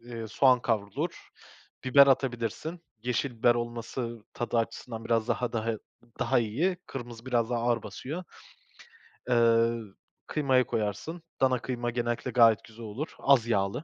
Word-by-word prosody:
eee, 115 -1 -7
soğan 125 +3 +4
kavrulur. 105 -4 -2 0.6
Biber 140 +2 +7
atabilirsin. 135 +5 0 0.2
Yeşil 125 +3 0
biber 120 +1 +5
olması 120 -1 -4
tadı 120 0 -1
açısından 115 0 -4
biraz 115 0 +1
daha 120 +1 0
daha 115 -1 -1
i 110 - -5 0.4
daha 135 - +2
iyi. 140 - 0
Kırmızı 120 -2 -8
biraz 120 -2 +1
daha 120 -1 0
ağır 120 -2 +1
basıyor. 135 - -6 1.1
Eee, 115 -1 +4 0.5
kıymayı 130 -4 +2
koyarsın, 110 - -3 0.2
dana 130 -2 +3
kıyma 120 -1 -2
genellikle 120 +1 -2
gayet 115 -3 +5
güzel 115 +1 -11
olur, 120 +9 -5
az 135 -5 +4
yağlı. 105 +4 0
120 Hz, 140 wpm, -29 LUFS, 115-130 Hz, 1.1 s, Biber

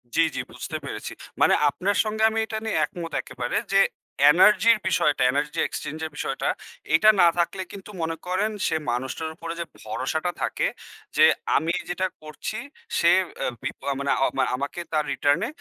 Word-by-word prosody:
জি, - - +1 0.2
জি, - - -2
বুঝতে - - -5
পেরেছি। - - -5 0.3
মানে - - +6 0.2
আপনার 195 +7 -1
সঙ্গে 215 0 -2
আমি 225 0 -1
এটা 220 0 -4
নিয়ে 220 - 0
একমত 170 -5 -8
একেবারে 120 -1 -3 0.2
যে, 195 - +6 0.5
এনার্জির 210 +6 +6
বিষয়টা 150 -5 +2
Energy 145 +2 -2
Exchange 155 +2 -6
এর 160 - -6
বিষয়টা 135 - -2 0.5
এটা 215 +7 +6
না 175 - +8
থাকলে 175 +2 0
কিন্তু 195 +1 -10
মনে 165 0 -1
করেন 195 +4 0 0.2
সে 160 - 0 0.2
মানুষটার 130 +6 -3
উপরে 165 0 -6
যে 170 - -2 0.2
ভরসাটা 165 +3 -2
থাকে - - 0 0.5
যে - - +8 0.3
আমি 160 +4 0 0.2
যেটা 185 +1 0
করছি 155 +7 -6 0.4
সে 170 - +5 0.3
আ - - 0 0.2
বিপ 135 - -4
আ - - +2
মানে 140 0 0 0.4
আমাকে 140 +6 -4
তার 155 - +2
রিটার্নে 145 +9 +2
170 Hz, 165 wpm, -25 LUFS, 150-195 Hz, 0.5 s, না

